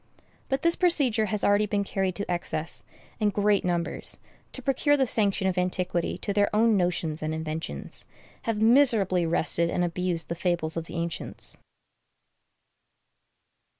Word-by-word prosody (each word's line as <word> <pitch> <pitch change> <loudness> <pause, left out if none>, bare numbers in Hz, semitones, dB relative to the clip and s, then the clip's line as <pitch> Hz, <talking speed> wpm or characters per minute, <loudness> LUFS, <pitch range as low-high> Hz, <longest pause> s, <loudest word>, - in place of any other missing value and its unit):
But 270 +1 -1
this 335 0 +3
procedure 270 -12 +3
has 210 -1 -1
already 205 +1 +3
been 205 0 0
carried 190 -2 -1
to 200 - -2
excess; 175 -2 -2 0.4
and 210 -2 +2
great 205 0 +2
numbers, 175 -1 -1 0.3
to - - -4
procure 290 +2 +2
the 270 - +3
sanction 200 -5 +1
of 185 -1 0
antiquity 180 -1 -1
to 200 - -1
their 205 0 +3
own 225 0 +4
notions 175 -4 0
and 155 +1 -2
inventions, 160 0 -5 0.4
have 225 -2 -1
miserably 220 -7 +4
wrested 170 +1 +1
and 180 - 0
abused 175 -1 -1
the - - -2
fables 170 -2 -1
of 165 -1 -3
the - - -9
ancients. 170 0 -2
190 Hz, 150 wpm, -27 LUFS, 170-215 Hz, 0.4 s, own